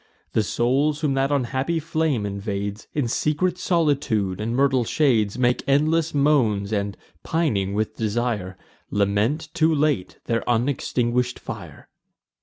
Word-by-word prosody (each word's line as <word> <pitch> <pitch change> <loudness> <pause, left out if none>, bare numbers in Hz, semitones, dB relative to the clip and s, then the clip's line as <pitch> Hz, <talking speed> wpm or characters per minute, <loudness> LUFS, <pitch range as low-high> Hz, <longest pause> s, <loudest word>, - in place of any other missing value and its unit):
The 110 - +3
souls 135 +8 +1
whom 150 -3 +1
that 135 +1 +1
unhappy 135 +4 0
flame 155 -7 0
invades, 100 +1 -4
In 145 -5 +1
secret 155 +9 0
solitude 140 - +1
and 115 +2 -2
myrtle 135 -2 +3
shades 115 -5 +1
Make 125 0 +2
endless 155 +3 +2
moans, 120 -9 +2
and, 100 -1 -2 0.2
pining 105 - 0
with 110 +1 -2
desire, 110 -4 -2 0.3
Lament 105 +10 0
too 165 -1 +3
late 145 -10 0
their 115 -1 0
unextinguish'd 125 0 0
fire. - - -9
125 Hz, 125 wpm, -23 LUFS, 105-150 Hz, 0.3 s, The